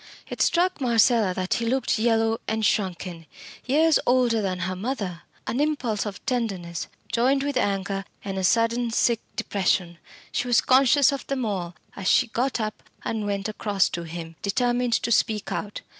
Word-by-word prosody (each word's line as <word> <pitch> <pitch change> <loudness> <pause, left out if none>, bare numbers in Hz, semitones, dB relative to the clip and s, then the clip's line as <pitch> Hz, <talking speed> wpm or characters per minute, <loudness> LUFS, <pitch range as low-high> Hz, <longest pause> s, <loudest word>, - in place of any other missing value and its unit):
It - - -5
struck 355 -2 +2
Marcella 230 -4 +3
that 185 -1 -1
he 235 - -1
looked 255 -2 +1
yellow 225 0 +2
and 220 0 0
shrunken 180 -5 -1 0.4
years 310 +4 +4
older 245 -3 +3
than 185 -2 -2
her 185 0 -2
mother. 195 - -4 0.2
An 245 - -2
impulse 265 -9 0
of 200 - -8
tenderness, 195 -10 -2 0.2
joined 260 +4 +2
with 285 -1 -2
anger 195 -4 -1 0.2
and 195 -1 -3
a - - -2
sudden 230 +4 +2
sick 230 0 +2 0.2
depression 180 -3 0 0.3
she 250 - -1
was 245 - +4
conscious 275 +2 +5
of 275 - -5
them 265 -3 -1
all 180 -5 -3 0.2
as 195 -2 -4
she 255 - +5
got 245 +3 -1
up 215 -1 -3 0.2
and 215 -2 -2
went 200 0 -2
across 205 -2 0
to 170 - -4
him, 165 0 -7
determined 245 +3 0
to 235 - 0
speak 215 -1 +1
out. 205 0 -4
225 Hz, 170 wpm, -25 LUFS, 195-245 Hz, 0.4 s, conscious